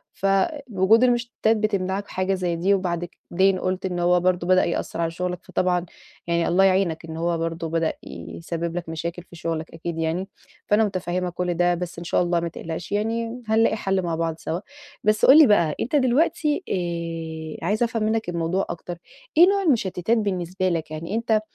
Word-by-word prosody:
فوجود 215 - +2
المُشتِّتات 240 -2 +2
بتمنعك 200 -2 -1
حاجة 185 +1 -1
زي 180 -2 -1
دي. 190 +4 +2
وبعد 175 -3 -1
كد - - -13 0.2
بعدين 190 +1 +3
قُلت 185 +1 -2
إن 180 -1 -2
هو 175 +1 +4
برضه 180 -1 +1
بدأ 185 0 +5
يأثِّر 170 0 -2
على 165 0 0
شغلك 180 +1 -3
فطبعًا 180 -1 0 0.4
يعني، 170 0 +1
الله 185 +3 +4
يعينك، 185 -4 +2
إن 160 0 -7
هو 170 0 0
برضه 165 0 -3
بدأ 165 -1 0
يسبَّب 170 0 -5
لك 175 -2 -5
مشاكل 170 +2 -4
في 175 - -16
شغلك، 165 -1 -4
أكيد 165 0 -5
يعني. 165 +4 -1 0.4
فأنا 210 +2 +4
متفهِّمة 180 -2 -2
كل 175 0 -2
ده، 175 +1 +2
بس، 175 0 -5
إن - - -7
شاء - - +2
الله، 175 0 +1
ما 170 - -2
تقلقش 165 +2 -6
يعني، 230 +3 -1
هنلاقي 220 0 +3
حلّ 195 -2 0
مع 170 -2 -2
بعض 165 -1 -1
سوا. 165 +2 -3 0.4
بس، 215 +1 +3
قُل 275 +4 +9
لي 305 -5 +9
بقى، 170 -7 +3
أنت 255 - -1
دلوقتي 295 +5 +2 1.0
آآ، - - -5
عايزة 215 +5 +1
أفهم 225 -2 -1
منك 220 -2 0
الموضوع 170 +3 -1
أكتر، 170 0 -6 0.4
إيه 350 +2 +9
نوع 400 0 +2
المُشتِّتات 220 - +1
بالنسبة 185 -3 -1
لك؟ 160 -2 -2
يعني 165 +7 -4
أنت 225 -2 +1
185 Hz, 185 wpm, -24 LUFS, 170-215 Hz, 1.0 s, قُل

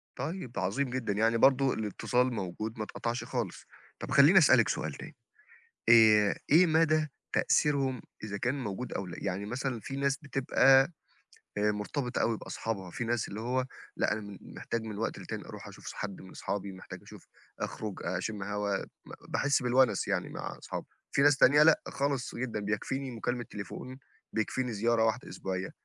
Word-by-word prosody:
طيب، 140 -1 -4
ده - - -3
عظيم 125 +9 0
جدًا، 120 -5 -2
يعني 115 +2 +2
برضه 135 +1 +4
الاتصال 125 +4 0
موجود 110 +3 -4
ما 110 - -2
اتقطعش 120 +3 -3
خالص. 120 -6 -4 0.3
طَب - - -6
خلّيني 150 +7 +7
أسألِك 130 -7 +5
سؤال 80 -2 -2
تاني، - - -10 0.7
آآ، 110 -3 +6
إيه 170 +5 +7
مدى 155 -1 +3 0.3
تأثيرهم 135 -4 +2 0.2
إذا 100 -2 -4
كان 130 +5 -1
موجود 105 +4 -4
أو 100 - -3
لأ؟ 85 - -8
يعني 95 +1 -2
مثلًا 125 +1 -3
فيه 135 +5 -6
ناس 140 0 +1
بتبقى 135 0 +4 0.7
آآ 105 0 +2
مرتبطة 125 +5 -3
أوي 115 -1 +1
بأصحابها، 95 -6 -5
فيه 120 - -4
ناس 120 0 -1
اللي 105 +2 -6
هو 125 +2 0 0.3
لأ - - +1
أنا 110 - -2
م 100 -3 -9
محتاج 115 -1 -5
من 105 -2 -6
وقت 115 - -2
للتاني - - -6
أرُوح - - -9
أشوف - - -13
ص - - -5
حد 100 -2 -5
من 95 - -12
اصحابي، 100 -1 -4
محتاج 95 - -10
أشوف - - -14 0.3
أخرج 105 -3 -4
أشم 95 +3 -3
هوا، 100 -1 -1 0.3
م - - -10 0.2
باحس 140 -2 +1
بالونس 125 -4 +3
يعني - - 0
مع - - -6
اصحابي، - - -6 0.3
فيه 140 - +3
ناس 145 -1 +6
تانية 145 +3 +6
لأ، 160 0 +6
خالص 140 -2 -2
جدًا 115 -3 -3
بيكفيني 130 +6 -2
مكالمة 120 +1 -3
تليفون، 125 +5 -7 0.3
بيكفيني 120 +2 -1
زيارة 115 +2 +2
واحدة 115 +4 0
أسبوعية. 95 0 -4
115 Hz, 175 wpm, -30 LUFS, 105-135 Hz, 0.7 s, خلّيني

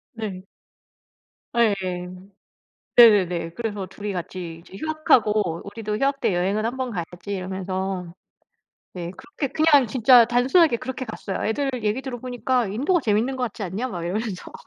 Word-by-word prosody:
네. 205 -5 -5 1.1
예. 230 -3 +4 1.2
네네네. 185 -8 +6
그래서 210 -4 -4
2이 205 +2 -6
같이 175 -2 -6
이제 175 +3 -13
휴학하고 215 - +1
"우리도 210 +1 -4
휴학 275 +2 0
때 190 - +1
여행은 195 +5 0
1 235 +3 -2
번 260 -1 -2
가야지." 175 -1 -6
이러면서. 185 -1 -4 0.8
네. 175 -2 -5
그렇게 280 - -5
그냥 300 -4 +5
진짜 245 +1 +6
단순하게 250 +5 +4
그렇게 260 +2 -5
갔어요. 220 -4 -5
"애들 270 +5 0
얘기 215 +5 0
들어보니까 245 -2 -1
인도가 285 - +1
재밌는 225 +2 +1
것 255 - -3
같지 225 -2 -3
않냐?" 200 +8 -3
막 175 -7 -5
이러면서. 195 +2 -4
215 Hz, 315 characters per minute, -23 LUFS, 190-255 Hz, 1.2 s, 네네네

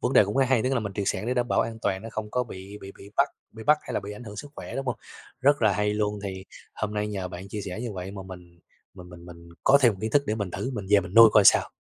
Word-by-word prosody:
vấn 125 - 0
đề - - +7
cũng 100 +4 -4
rất 135 - +5
hay. 130 -4 +3
Tức 130 +1 0
là, 125 - +1
mình 100 -2 -5
triệt 100 - -3
sản 100 +4 -2
để 125 - 0
đảm 120 -1 0
bảo - - +2
an 115 -1 -3
toàn 95 -1 -1
nó 115 - -7
không 110 -1 -5
có 125 +2 0
bị 100 -2 -10
bị 95 0 -9
bị 100 - -13
bắt - - +4 0.2
bị 110 - -10
bắt 150 0 +5
hay - - -7
là - - 0
bị 100 +1 -7
ảnh 105 +4 -10
hưởng 105 -2 -9
sức 145 +6 -8
khỏe, - - -7
đúng 135 0 -4
hông? 125 - -1 0.4
Rất 145 0 +3
là 110 -2 +4
hay 105 +2 0
luôn, 105 0 -1
thì 95 -1 -6 0.3
hôm 105 0 -4
nay 105 0 -1
nhờ 95 -3 -4
bạn 90 +2 -9
chia 105 +1 -5
sẻ 95 +1 -6
như 120 -3 -4
vậy 95 0 -6
mà 100 -1 -8
mình 90 -2 -12 0.4
mình 90 -2 -12
mình 85 -1 -12
mình 85 -1 -13 0.2
có 140 +1 +7
thêm 120 -4 +6
một 95 - -11
kiến 110 - -1
thức 145 +5 +3
để 105 - 0
mình 100 -4 -3
thử, 130 - -4
mình 100 -4 -5
về 105 -1 +6
mình 95 0 -9
nuôi 115 -1 +10
coi 105 - +6
sao. - - +6
105 Hz, 330 wpm, -26 LUFS, 95-115 Hz, 0.4 s, nuôi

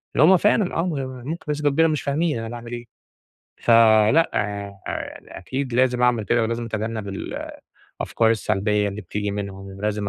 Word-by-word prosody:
إن - - +3
همّ 180 +4 +7
فعلًا 205 0 +2
آه، - - +2
م - - -1
و - - -3 0.3
ممكن 160 +4 -5
بنسبة 150 0 +1
كبيرة 160 +3 +3
بس - - +1
مش 150 - -1
فاهمين 150 -2 0
أنا 115 0 -5
باعمل 120 0 -8
إيه. 120 0 -6 0.8
فلأ، 115 +6 +5
يع 100 -1 -2 0.2
ع - - -6
أكيد 130 +4 -4
لازم 125 -1 +2
أعمل 120 -3 +3
كده 120 +2 +2
ولازم 115 +1 -2
أتجنب 110 -1 -3
ال 95 - -5 0.5
الأفكار 115 -1 +2
السلبيّة 105 -1 +1
اللي 100 +1 -6
بتيجي 105 +2 -3
منهم. 100 -1 -5
ولازم 105 0 -2
115 Hz, 185 wpm, -23 LUFS, 105-140 Hz, 0.8 s, همّ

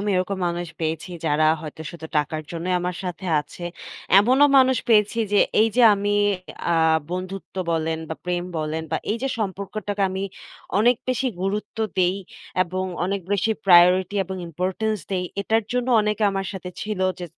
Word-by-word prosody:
আমি 205 +1 -1
এরকম 185 +1 -1
মানুষ 175 +1 -3
পেয়েছি, 160 +2 -2 0.2
যারা 155 +1 +3
হয়তো 155 0 -8
শুধু 160 -2 -9
টাকার 155 +1 0
জন্যই 175 +2 -2
আমার 180 0 -3
সাথে 180 +1 -5
আছে। 150 +4 -12 0.6
এমনও 255 +7 +5
মানুষ 260 0 +4
পেয়েছি 215 0 +4
যে, 205 - +5 0.2
এইযে 225 +3 +3
আমি 205 +1 -1 0.6
আ - - +3 0.4
বন্ধুত্ব 185 +2 -5 0.2
বলেন 160 0 -1
বা, 160 - -3
প্রেম 175 0 -1
বলেন 155 +1 -2
বা, - - +1 0.2
এইযে 250 +4 -2
সম্পর্কটাকে 200 0 -3
আমি 190 +1 -3 0.6
অনেক 240 +4 +4
বেশি 255 +1 0 0.2
গুরুত্ব 205 +3 -3 0.2
দেই 180 +1 +3 0.5
এবং 185 +2 -3 0.2
অনেক 195 +1 -1
বেশি 205 +2 +1 0.2
প্রায়োরিটি 180 +1 +6
এবং 190 +1 -6
ইম্পোর্টেন্স 190 +6 -2
দেই। 185 -2 -1 0.2
এটার 220 +2 +1
জন্য 250 0 -1
অনেকে 210 0 -1
আমার 195 0 -2
সাথে 185 -2 -6
ছিল 210 -2 -4 0.2
যে, 175 - -3
190 Hz, 160 wpm, -23 LUFS, 175-210 Hz, 0.6 s, প্রায়োরিটি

